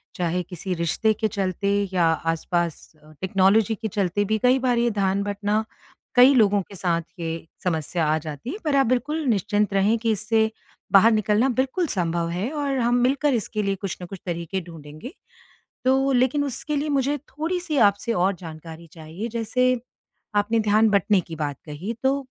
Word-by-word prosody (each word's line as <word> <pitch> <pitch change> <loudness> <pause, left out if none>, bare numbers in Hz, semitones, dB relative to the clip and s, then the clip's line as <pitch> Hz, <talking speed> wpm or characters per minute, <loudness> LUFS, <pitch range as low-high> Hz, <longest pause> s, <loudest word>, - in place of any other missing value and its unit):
चाहे 180 0 -1
किसी 180 +2 -5
रिश्ते 170 +6 +1
के 220 +1 -1
चलते 195 -1 -2 0.2
या 175 -2 +3 0.3
आसपास 170 0 -2 0.3
टेक्नोलॉज़ी 195 +4 +3
के 220 +1 -4
चलते 200 0 0
भी 220 +2 +1
कई 255 +1 +4
बार 250 -2 +1
ये 235 0 +2
ध्यान 200 -1 0
बटना 205 +1 -1 0.5
कई 255 +3 +8
लोगों 205 -4 +4
के 200 - -12
साथ 170 -2 0 0.2
ये 165 0 -4 0.2
समस्या 165 -1 -1
आ 155 +1 +2
जाती 155 - -7
है। 385 - -4
पर 300 -3 +1
आप 270 -1 +4
बिल्कुल 300 +6 0
निश्चिंत 205 -3 +1
रहें 200 +4 +3
कि 225 -1 0
इससे 220 +1 +1 0.4
बाहर 210 +4 +7
निकलना 215 +4 +2
बिल्कुल 265 +7 0
संभव 170 -4 -1
है 185 +8 -2
और 285 -3 -1
हम 240 0 +2
मिलकर 275 +2 +2
इसके 215 -1 -1
लिए 195 0 0
कुछ 195 -1 -5
न - - -5
कुछ 190 +1 -9
तरीक़े 175 +2 -3
ढूँढ़ेंगे। 160 - -10 0.7
तो 270 +1 +3
लेकिन 260 +3 +2
उसके 285 +3 -3
लिए 295 +2 -1
मुझे 280 0 +1
थोड़ी-सी 315 +4 -3
आपसे 205 +3 0
और 190 0 +1
जानकारी 165 0 -10
चाहिए। 165 +7 -7
जैसे 240 +2 0 0.6
आपने 220 +2 +2
ध्यान 215 +1 +3
बंटने 200 -1 +3
की 165 -2 -9
बात 145 -2 -3
कही। 160 +9 -5
तो 275 +1 +2
205 Hz, 175 wpm, -24 LUFS, 180-250 Hz, 0.7 s, कई